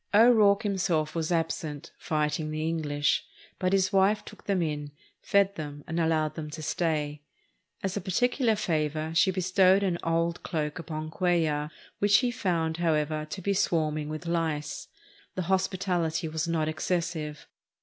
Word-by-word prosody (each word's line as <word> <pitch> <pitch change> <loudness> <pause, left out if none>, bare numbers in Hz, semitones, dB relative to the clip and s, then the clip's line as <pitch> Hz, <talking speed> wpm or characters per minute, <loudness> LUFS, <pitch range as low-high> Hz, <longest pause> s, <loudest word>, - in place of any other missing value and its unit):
O'Rourke 215 -3 +6
himself 180 -7 0
was 165 0 -2
absent, 160 -3 -2
"fighting 155 0 -1
the 155 +1 -2
English," 145 -3 0 0.4
but 185 0 +1
his 195 0 +2
wife 195 +2 +3
took 210 - -13
them 195 -2 +1
in, 150 -2 -3 0.3
fed 200 0 +3
them, 145 -2 -6
and 165 +1 -2
allowed 160 -2 +1
them 155 -2 -6
to 155 +1 -7
stay. 150 -3 -1 0.6
As 195 -1 -1
a 205 - -2
particular 235 +4 +1
favor 155 -3 -1
she 170 +3 +4
bestowed 185 +1 +3
an 180 -3 0
old 165 +1 0
cloak 155 0 -3
upon 155 -1 -5
Cuellar, 160 -5 +1 0.3
which 205 0 +5
he 250 -2 +1
found, 165 -8 -1
however, 155 -2 0
to 190 - -5
be 200 - +1
swarming 155 -5 0
with 155 +2 -5
lice. 165 -3 -2 0.5
The 185 - -1
hospitality 185 -3 0
was 160 +1 -2
not 160 -2 0
excessive. 155 -1 -2
165 Hz, 150 wpm, -28 LUFS, 155-190 Hz, 0.6 s, O'Rourke